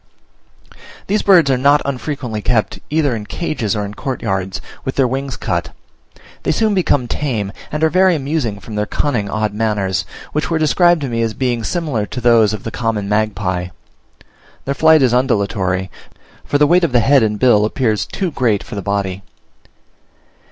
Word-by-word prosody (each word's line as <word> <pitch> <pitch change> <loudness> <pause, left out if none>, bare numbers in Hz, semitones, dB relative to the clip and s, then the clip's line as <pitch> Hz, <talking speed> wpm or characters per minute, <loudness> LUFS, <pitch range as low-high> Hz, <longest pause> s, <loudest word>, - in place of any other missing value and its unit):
These 210 +2 0
birds 175 -8 +5
are 130 - +1
not 145 +2 +4
unfrequently 130 -4 -4
kept 110 -3 0
either 150 -5 +1
in 105 -2 -6
cages 120 - -2
or 105 -1 -2
in 100 - -7
courtyards, 95 -7 -3 0.2
with 130 - -3
their 135 -2 +3
wings 135 +1 -3
cut. - - -3 0.7
They - - 0
soon 215 +6 +1
become 145 -9 +1
tame, 115 -8 -2 0.2
and 150 +1 -2
are 160 - +5
very 185 -1 +4
amusing 135 -8 -2
from 110 +3 -10
their 105 0 -1
cunning 120 -9 -1
odd 110 -1 -1
manners, 105 -4 0 0.3
which 150 - -1
were 165 - +1
described 170 +2 +3
to 140 - -2
me 115 -2 -2
as 115 -1 -1
being 120 -3 -1
similar 145 - -2
to 125 - -5
those 115 -3 +4
of 110 -3 -5
the 115 - -5
common 110 -4 -2
magpie. 100 -4 -1 1.0
Their 140 - -1
flight 160 0 +5
is 125 -2 +3
undulatory, 100 -7 0 0.5
for 145 - 0
the 150 - +4
weight 175 +4 +4
of 160 -7 +1
the 120 - +5
head 135 +2 +4
and 105 -1 0
bill 110 -3 +4
appears 110 -1 0
too 185 -4 -3
great 115 -8 0
for - - -11
the 100 - -3
body. 100 -1 -2
120 Hz, 180 wpm, -17 LUFS, 105-145 Hz, 1.0 s, birds